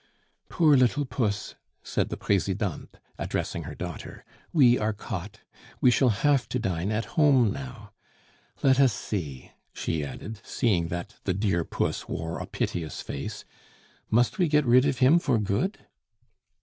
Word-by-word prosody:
"Poor 155 -4 +4
little 130 +3 +3
puss!" 110 -5 -2 0.3
said - - -1
the - - -4
Presidente, 100 -2 -1 0.2
addressing - - -3
her - - -7
daughter, - - -7 0.3
"we 125 -6 +5
are 110 0 0
caught. 100 -2 -7 0.4
We 125 - +5
shall 125 +1 +4
have 130 +5 +2
to - - -1
dine 95 -3 -1
at 110 +1 -1
home 125 -4 +3
now. 125 -6 -8 0.7
Let 135 -1 +5
us 135 -5 +5
see," 80 - -5 0.2
she 80 -2 -2
added, 100 +10 -7
seeing 95 -10 +1
that 85 +5 -6
the 95 - 0
"dear 95 -4 +1
puss" - - -2
wore 80 +1 -4
a - - -5
piteous 80 -3 -3
face; - - -6 0.6
"must 120 - +2
we 180 - +4
get 150 -1 +3
rid 125 +3 +5
of 135 -2 0
him 140 +6 +5
for 140 -8 +1
good?" 110 - -1
110 Hz, 150 wpm, -27 LUFS, 95-130 Hz, 0.7 s, we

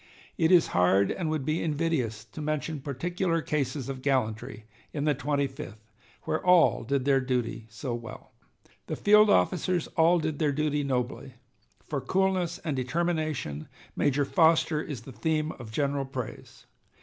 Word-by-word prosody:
It 165 -1 +2
is 180 -2 +5
hard, 95 +2 +3
and 170 -4 -2
would 155 -4 -2
be 155 +3 0
invidious, 145 -9 -1
to 155 - -9
mention 155 0 -2
particular 165 +5 -1
cases 140 -4 -2
of 135 -1 -5
gallantry 110 -5 -1 0.3
in 145 -1 -2
the 150 - +3
Twenty 140 +1 0
fifth, 135 -5 -8 0.5
where - - -2
all 180 -7 +5
did 135 +2 -1
their 135 -1 +3
duty 125 -3 -2
so 120 +3 -5
well.... 115 -1 -8 0.6
The - - -2
field 210 +1 +5
officers 180 -3 +2
all 165 +2 +4
did 155 -3 -2
their 150 -2 +2
duty 150 0 0
nobly. 130 0 -3 0.5
For 140 -3 -2
coolness 185 +3 0
and 150 -4 -2
determination 155 - -2 0.3
Major 145 0 +1
Foster 160 -1 +3
is 140 -7 -6
the 125 - -11
theme 155 +7 -1
of 120 -3 -8
general 140 +2 0
praise.... 130 -3 -8
145 Hz, 155 wpm, -28 LUFS, 130-160 Hz, 0.6 s, is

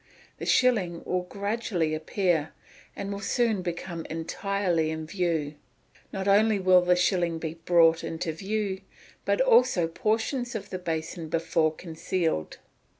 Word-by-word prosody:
The - - -5
shilling 195 -10 +2
will 180 0 0
gradually 200 -3 -2
appear, 160 0 0 0.4
and 200 0 -5
will 200 - -4
soon 220 0 +1
come 170 -1 -4
entirely 170 +1 -1
in 160 0 -4
view. 165 -4 -1 0.6
Not 195 0 -4
only 210 +2 +4
will 185 -1 +5
the 180 0 +3
shilling 175 -2 +1
be 160 -1 -4
brought 165 -2 +5
in 165 - -4
view, 190 +4 -3 0.4
but - - +2
also 470 - +4
portions 225 - -1
of 205 -2 -6
the 185 - -3
basin 165 -1 -4
before 165 -1 +1
concealed. 160 - -3
180 Hz, 135 wpm, -27 LUFS, 165-200 Hz, 0.6 s, will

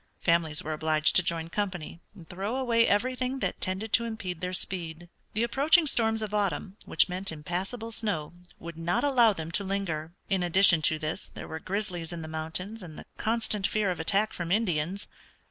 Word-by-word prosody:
Families 165 -3 +1
were 155 - -3
obliged 155 -1 +3
to - - +8
join 165 -1 -1
company 180 -4 -3 0.2
and 170 -5 -13
throw 195 +8 -3
away 235 -3 +3
everything 255 +5 0
that - - -3
tended 190 +4 -2
to 235 - +5
impede 205 -7 -5
their 180 0 -2
speed. 175 -2 -3 0.2
The 220 - +1
approaching 295 +7 +4
storms 225 -5 +2
of 210 -1 -5
autumn, 200 -2 -1
which - - +3
meant 185 +1 -2
impassable 185 +9 -4
snow, 200 -9 -1 0.2
would 170 -1 -9
not 170 +7 0
allow 245 -6 +5
them 165 -3 -6
to 200 - 0
linger. 175 -5 -3
In 195 -2 +1
addition 175 -1 +5
to 155 - -1
this 155 +1 -2
there - - -9
were 160 - -5
grizzlies 185 -2 -2
in 170 -2 -6
the - - -6
mountains 160 +7 -4
and 165 -4 -9
the - - -9
constant 220 -3 0
fear 210 -3 +1
of 175 - -4
attack 200 +6 +1
from 175 -1 -4
Indians. 185 -2 0
185 Hz, 190 wpm, -28 LUFS, 165-215 Hz, 0.2 s, to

